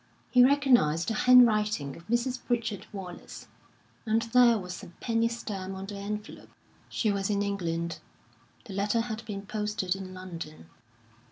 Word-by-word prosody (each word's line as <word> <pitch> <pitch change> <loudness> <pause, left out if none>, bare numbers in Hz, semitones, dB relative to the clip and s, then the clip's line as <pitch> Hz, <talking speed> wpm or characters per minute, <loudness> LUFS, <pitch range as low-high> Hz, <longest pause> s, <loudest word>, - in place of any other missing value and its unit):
He 250 -1 +7
recognised 250 - +4
the - - 0
handwriting 215 - +4
of 170 - -14
Mrs. 245 +2 0
Pritchard 230 -4 -2
Wallace, 190 -4 -9 0.6
and 225 0 +1
there 245 -2 +6
was 180 -2 -6
a 195 - -10
penny 230 -1 +1
stamp 200 -5 -5
on 190 0 -6
the 200 0 -7
envelope. 210 +1 -6 0.4
She 215 - 0
was 195 0 -1
in 200 -1 +1
England. 170 -4 -2 0.7
The 205 - -8
letter 205 +4 +1
had 225 -1 -5
been 200 -2 -6
posted 210 -3 -2
in 190 -1 -7
London. 165 - -8
210 Hz, 150 wpm, -28 LUFS, 185-230 Hz, 0.7 s, He